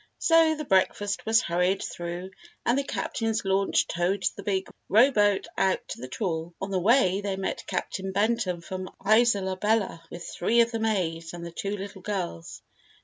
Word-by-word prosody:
_ -, -, -30 dB
Page -, -, -5 dB
52] -, -, +2 dB
So, 325 Hz, -1 st, +6 dB
the 305 Hz, 0 st, -5 dB
breakfast 200 Hz, +1 st, +1 dB
was 225 Hz, +1 st, +5 dB
hurried 180 Hz, +3 st, +1 dB
through 175 Hz, +2 st, -5 dB, 0.3 s
and 240 Hz, -, +3 dB
the 280 Hz, -, +1 dB
Captain's 225 Hz, -5 st, -2 dB
launch 195 Hz, +1 st, +2 dB
towed 180 Hz, +3 st, -1 dB
the -, -, -7 dB
big 190 Hz, -2 st, -1 dB, 0.2 s
rowboat 210 Hz, -3 st, +4 dB
out 190 Hz, -1 st, +1 dB
to -, -, -6 dB
the 130 Hz, -, -5 dB
trawl. 170 Hz, -, -3 dB
On 195 Hz, +1 st, -4 dB
the 190 Hz, -, +1 dB
way, 200 Hz, -2 st, +3 dB
they 200 Hz, -1 st, -2 dB
met 190 Hz, 0 st, -3 dB
Captain 190 Hz, +1 st, -3 dB
Benton 200 Hz, -3 st, 0 dB
from 185 Hz, +1 st, -6 dB, 0.2 s
Isola 205 Hz, -3 st, +3 dB
Bella 210 Hz, -4 st, 0 dB
with 170 Hz, 0 st, -8 dB
three 230 Hz, +6 st, +2 dB
of 235 Hz, 0 st, +2 dB
the 225 Hz, -, -2 dB
maids 175 Hz, -7 st, -1 dB
and 170 Hz, 0 st, -7 dB
the 170 Hz, -, -7 dB
two 200 Hz, +4 st, -3 dB
little 195 Hz, 0 st, -8 dB
girls. 180 Hz, -, -5 dB
195 Hz, 190 wpm, -27 LUFS, 180-220 Hz, 0.3 s, So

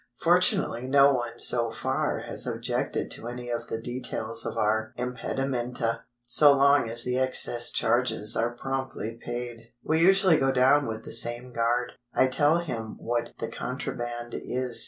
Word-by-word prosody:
Fortunately 120 Hz, +2 st, +2 dB
no 140 Hz, +1 st, +5 dB
one 120 Hz, -2 st, -3 dB
so 120 Hz, -1 st, +1 dB
far 110 Hz, -1 st, -2 dB
has -, -, -3 dB
objected -, -, -2 dB
to 115 Hz, -, -7 dB
any 120 Hz, 0 st, -6 dB
of 120 Hz, 0 st, -3 dB
the 115 Hz, -, -4 dB
details 115 Hz, -2 st, -2 dB
of -, -, -5 dB
our 110 Hz, +1 st, 0 dB
impedimenta, 125 Hz, -2 st, -3 dB, 0.2 s
so 145 Hz, +4 st, +5 dB
long 140 Hz, -3 st, +4 dB
as 115 Hz, +1 st, +5 dB
the 125 Hz, +1 st, 0 dB
excess 120 Hz, -2 st, +1 dB
charges 115 Hz, -3 st, 0 dB
are 120 Hz, +1 st, -1 dB
promptly 130 Hz, -3 st, -4 dB
paid. 120 Hz, -1 st, -6 dB
We 160 Hz, +1 st, +1 dB
usually 190 Hz, -1 st, +5 dB
go 135 Hz, -1 st, +2 dB
down 135 Hz, +2 st, +3 dB
with 110 Hz, 0 st, -5 dB
the -, -, -8 dB
same 120 Hz, +2 st, +2 dB
guard. 120 Hz, +2 st, 0 dB, 0.2 s
I -, -, +5 dB
tell 145 Hz, +5 st, +2 dB
him 120 Hz, -10 st, -5 dB
what 120 Hz, 0 st, -3 dB
the 115 Hz, -, -4 dB
contraband 120 Hz, -1 st, -5 dB
is. 125 Hz, -1 st, -1 dB
120 Hz, 155 wpm, -27 LUFS, 115-130 Hz, 0.2 s, no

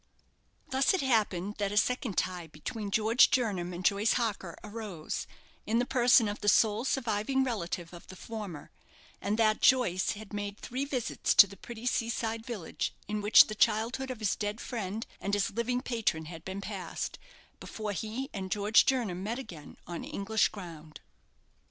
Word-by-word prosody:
Thus 265 Hz, +7 st, +3 dB
it 375 Hz, -, 0 dB
happened 210 Hz, -6 st, +1 dB
that 200 Hz, -1 st, 0 dB
a 205 Hz, -, -2 dB
second 250 Hz, -2 st, +1 dB
tie 180 Hz, -2 st, -1 dB
between 200 Hz, +8 st, -6 dB
George 220 Hz, +4 st, +5 dB
Jernam 200 Hz, -9 st, 0 dB
and 180 Hz, +1 st, -6 dB
Joyce 205 Hz, +2 st, +3 dB
Harker 205 Hz, -8 st, -2 dB
arose, 210 Hz, -7 st, -5 dB, 0.4 s
in 225 Hz, -, +2 dB
the 245 Hz, -, +2 dB
person 245 Hz, -3 st, +5 dB
of 205 Hz, +1 st, -4 dB
the 205 Hz, -, -4 dB
sole 220 Hz, +3 st, +3 dB
surviving 260 Hz, 0 st, 0 dB
relative 180 Hz, -8 st, -3 dB
of 170 Hz, -, -12 dB
the 185 Hz, -, -10 dB
former, 200 Hz, -7 st, -7 dB, 0.5 s
and 205 Hz, +2 st, -1 dB
that 215 Hz, -1 st, +3 dB
Joyce 190 Hz, -9 st, +3 dB
had 210 Hz, 0 st, -11 dB
made 205 Hz, 0 st, -4 dB
three 255 Hz, +4 st, -4 dB
visits 260 Hz, -5 st, -1 dB
to -, -, +10 dB
the 200 Hz, 0 st, -12 dB
pretty 230 Hz, +4 st, -9 dB
sea 230 Hz, -2 st, +1 dB
side 225 Hz, -1 st, -3 dB
village 215 Hz, -9 st, -4 dB
in 210 Hz, +1 st, -2 dB
which 210 Hz, +1 st, +8 dB
the 215 Hz, -, -6 dB
childhood 225 Hz, +5 st, +1 dB
of 255 Hz, -, -4 dB
his 210 Hz, -, +1 dB
dead 210 Hz, +1 st, -3 dB
friend 220 Hz, -3 st, -4 dB
and 200 Hz, +1 st, -1 dB
his 200 Hz, -1 st, 0 dB
living 235 Hz, +3 st, -1 dB
patron 220 Hz, -10 st, -1 dB
had 165 Hz, 0 st, -9 dB
been 190 Hz, +2 st, -5 dB
passed, 195 Hz, -4 st, -5 dB, 0.4 s
before 215 Hz, -1 st, -5 dB
he 220 Hz, +7 st, -4 dB
and 190 Hz, -3 st, -4 dB
George 210 Hz, +3 st, +4 dB
Jernam 225 Hz, -9 st, 0 dB
met 220 Hz, +5 st, -3 dB
again 170 Hz, -, -9 dB
on 170 Hz, 0 st, -6 dB
English 210 Hz, +2 st, +1 dB
ground. 165 Hz, -6 st, -10 dB
210 Hz, 175 wpm, -30 LUFS, 190-235 Hz, 0.5 s, to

